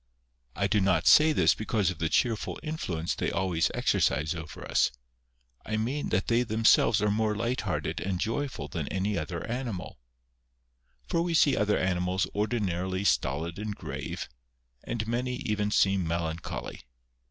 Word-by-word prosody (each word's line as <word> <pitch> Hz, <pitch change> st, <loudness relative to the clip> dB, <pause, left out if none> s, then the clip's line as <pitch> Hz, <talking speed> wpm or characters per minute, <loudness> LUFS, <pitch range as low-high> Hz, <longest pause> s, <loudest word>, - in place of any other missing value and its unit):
I 100 Hz, -, 0 dB
do 105 Hz, +1 st, +2 dB
not 95 Hz, -1 st, +2 dB
say 155 Hz, +1 st, +7 dB
this -, -, +4 dB
because 105 Hz, -4 st, 0 dB
of -, -, -9 dB
the 80 Hz, -, 0 dB
cheerful 115 Hz, -1 st, 0 dB
influ 155 Hz, -, -3 dB
ence 80 Hz, -, -1 dB
they -, -, -1 dB
always 85 Hz, -3 st, +1 dB
exercise 75 Hz, +1 st, +1 dB
over 80 Hz, -1 st, -8 dB
us; -, -, +3 dB, 0.7 s
I 110 Hz, -, -2 dB
mean 130 Hz, +7 st, -2 dB
that 95 Hz, +2 st, +1 dB
they 115 Hz, +1 st, +2 dB
themselves 110 Hz, -1 st, +3 dB
are 105 Hz, -, +2 dB
more 105 Hz, 0 st, +1 dB
light 120 Hz, +4 st, -1 dB
hearted -, -, -2 dB
and 95 Hz, -2 st, -2 dB
joyful 115 Hz, -, -2 dB
than 70 Hz, -, -4 dB
any 100 Hz, +2 st, -1 dB
other 85 Hz, 0 st, -3 dB
animal. 115 Hz, -, -5 dB, 1.1 s
For 165 Hz, -, +1 dB
we 170 Hz, -1 st, 0 dB
see 145 Hz, -3 st, +5 dB
other 105 Hz, 0 st, +2 dB
animals 90 Hz, 0 st, 0 dB
ordinarily 95 Hz, -4 st, -1 dB
stolid 85 Hz, 0 st, 0 dB
and 105 Hz, -1 st, -4 dB
grave, -, -, -5 dB, 0.6 s
and 110 Hz, -2 st, -3 dB
many 125 Hz, +2 st, -1 dB
even 105 Hz, -5 st, -1 dB
seem 95 Hz, -4 st, +2 dB
melancholy. 85 Hz, 0 st, -4 dB
105 Hz, 155 wpm, -28 LUFS, 90-115 Hz, 1.1 s, say